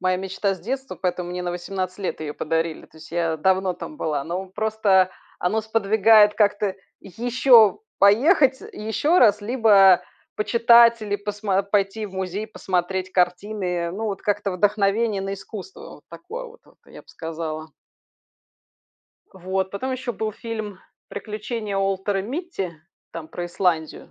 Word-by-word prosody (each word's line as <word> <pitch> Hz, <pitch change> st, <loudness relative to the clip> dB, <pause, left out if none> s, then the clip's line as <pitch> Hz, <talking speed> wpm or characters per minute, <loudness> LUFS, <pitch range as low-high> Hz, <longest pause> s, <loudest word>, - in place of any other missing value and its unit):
моя 185 Hz, 0 st, +1 dB
мечта 195 Hz, +1 st, -2 dB
с 185 Hz, -, -14 dB
детства, 265 Hz, +6 st, -4 dB
поэтому 180 Hz, -1 st, -3 dB
мне 180 Hz, 0 st, -4 dB
на 175 Hz, -, -2 dB
18 185 Hz, +1 st, -4 dB
лет 190 Hz, -4 st, -4 dB
ее 150 Hz, -1 st, -4 dB
подарили. 165 Hz, +1 st, -2 dB
То 160 Hz, -, -22 dB
есть 155 Hz, -, -13 dB
я 165 Hz, -1 st, -1 dB
давно 190 Hz, +2 st, +1 dB
там 300 Hz, -, -9 dB
была, 150 Hz, -, -2 dB
но 180 Hz, +3 st, -4 dB
просто 195 Hz, -2 st, +2 dB, 0.3 s
оно 215 Hz, +5 st, 0 dB
сподвигает 215 Hz, -1 st, +4 dB
как-то 205 Hz, -2 st, +1 dB, 0.3 s
еще 235 Hz, -, +4 dB, 0.2 s
поехать, 260 Hz, -, +4 dB
э, -, -, -10 dB
и -, -, -10 dB
еще 260 Hz, -, +2 dB
раз, 210 Hz, -3 st, +5 dB
либо 205 Hz, -5 st, +5 dB, 0.3 s
почитать 235 Hz, +2 st, +5 dB
или 205 Hz, -1 st, -2 dB
посмо 205 Hz, -1 st, -1 dB
пойти 200 Hz, +1 st, -1 dB
в 195 Hz, -, -13 dB
музей 190 Hz, +3 st, -4 dB
посмотреть 185 Hz, -2 st, -2 dB
картины, 190 Hz, +3 st, 0 dB
э. 175 Hz, -1 st, -1 dB
Ну 205 Hz, +6 st, -5 dB
вот 200 Hz, -3 st, -4 dB
как-то 200 Hz, -1 st, -1 dB
вдохновение 205 Hz, +2 st, +1 dB
на 195 Hz, 0 st, -3 dB
искусство 210 Hz, -, -10 dB, 0.2 s
вот -, -, -22 dB
такое 460 Hz, +8 st, -8 dB
вот, 480 Hz, 0 st, -13 dB
вот -, -, -23 dB
я -, -, -13 dB
б -, -, -36 dB
сказала. 160 Hz, -1 st, -6 dB, 1.6 s
Вот, 190 Hz, 0 st, -3 dB
потом 260 Hz, +6 st, -3 dB
еще 255 Hz, -1 st, -4 dB
был 215 Hz, -1 st, -3 dB
фильм 220 Hz, -3 st, -6 dB, 0.3 s
"Приключения 215 Hz, -1 st, -5 dB
Уолтера 195 Hz, 0 st, 0 dB
Митти" 255 Hz, -, -4 dB, 0.4 s
там 160 Hz, -2 st, -7 dB
про 175 Hz, 0 st, -5 dB
Исландию, 175 Hz, -3 st, -1 dB
200 Hz, 155 wpm, -23 LUFS, 185-220 Hz, 1.6 s, раз